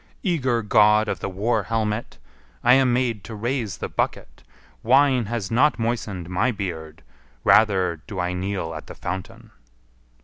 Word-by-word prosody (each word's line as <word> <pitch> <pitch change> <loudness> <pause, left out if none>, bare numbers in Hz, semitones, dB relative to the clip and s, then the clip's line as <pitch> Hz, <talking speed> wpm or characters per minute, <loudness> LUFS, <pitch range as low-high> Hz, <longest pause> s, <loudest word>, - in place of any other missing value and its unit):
Eager 130 - 0
God 105 +1 +4
of - - -2
the - - -4
war 110 +4 0
helmet! 110 +2 -2 0.5
I 125 - +6
am 130 -1 +4
made 120 -4 0
to 110 - -7
raise 115 -1 -2
the - - -4
bucket; - - -3 0.4
wine 130 0 +4
has 110 -2 -4
not 135 +6 +3
moistened 110 -7 -3
my 90 +7 +1
beard, 85 - -5 0.4
rather 95 -7 +3
do 100 -3 -6
I 90 0 -1
kneel 90 -2 -3
at 80 - -8
the - - -9
fountain." 90 +1 -7
110 Hz, 150 wpm, -23 LUFS, 95-120 Hz, 0.5 s, I